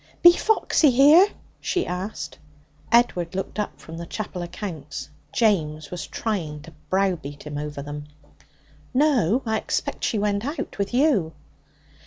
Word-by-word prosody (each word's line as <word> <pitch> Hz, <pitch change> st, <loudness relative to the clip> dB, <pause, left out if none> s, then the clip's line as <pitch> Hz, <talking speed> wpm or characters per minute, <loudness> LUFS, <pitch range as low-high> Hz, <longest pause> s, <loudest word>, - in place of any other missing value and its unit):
'Be 345 Hz, -, +11 dB
Foxy 350 Hz, -5 st, +3 dB
here?' 290 Hz, +9 st, +7 dB, 0.3 s
she 365 Hz, -, -1 dB
asked. 185 Hz, +4 st, -5 dB, 0.5 s
Edward 185 Hz, -8 st, +3 dB
looked 195 Hz, +2 st, -4 dB
up 210 Hz, -, -3 dB
from 165 Hz, 0 st, -9 dB
the 170 Hz, 0 st, -6 dB
chapel 195 Hz, -3 st, -5 dB
accounts. 175 Hz, -5 st, -6 dB, 0.2 s
James 160 Hz, -6 st, +1 dB
was 180 Hz, -, -5 dB
trying 170 Hz, -9 st, -3 dB
to 165 Hz, +1 st, -12 dB, 0.2 s
browbeat 180 Hz, -7 st, -1 dB
him 150 Hz, -1 st, -6 dB
over 150 Hz, -1 st, -5 dB
them. 145 Hz, 0 st, -6 dB, 0.9 s
'No. 260 Hz, -, +3 dB
I 220 Hz, -1 st, +1 dB
expect -, -, -3 dB
she 225 Hz, -, +1 dB
went 205 Hz, 0 st, 0 dB
out 285 Hz, -2 st, -4 dB
with 200 Hz, -, -1 dB
you.' 245 Hz, -, +2 dB
195 Hz, 140 wpm, -24 LUFS, 160-240 Hz, 0.9 s, Be